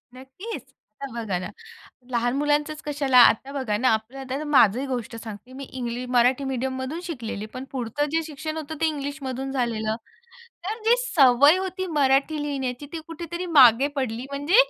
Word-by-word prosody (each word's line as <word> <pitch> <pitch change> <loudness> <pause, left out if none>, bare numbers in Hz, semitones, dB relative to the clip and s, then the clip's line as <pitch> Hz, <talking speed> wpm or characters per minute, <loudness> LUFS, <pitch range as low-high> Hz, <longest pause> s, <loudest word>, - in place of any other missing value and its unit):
नक्कीच. 265 - -8 0.4
आता 275 - -5
बघा 220 -6 -2
ना, 180 - -5 0.6
लहान 240 0 +1
मुलांचंच 295 +1 0
कशाला? 280 -3 +1
आता 245 +3 +5
बघा 260 -7 -1
ना, 255 +4 +2
आपलं. 220 +5 -3
आता 270 +2 -4
माझंही 265 -3 +4
गोष्ट 240 -3 -4
सांगते. 225 +2 -9
मी 275 - -7
इंग्लिश 250 -2 -5
मराठी 250 +2 +3
मीडियममधून 260 +4 -3
शिकलेली. 235 - -5
पण 255 - -5
पुढचं 260 +2 -2
जे 325 +1 +1
शिक्षण 310 +1 -6
होतं 315 0 -5
ते - - +4
इंग्लिशमधून 275 -3 -4
झालेलं. 225 -4 -1 0.7
तर 435 +4 -3
जी 470 +2 +6
सवय 295 - +5
होती 375 0 -3
मराठी 290 0 +2
लिहिण्याची, 270 -2 -3
ती 330 - -3
कुठेतरी 340 +2 -5
मागे 250 +2 +8
पडली. 250 -2 -2
म्हणजे 285 +6 0
270 Hz, 160 wpm, -24 LUFS, 245-300 Hz, 0.7 s, मागे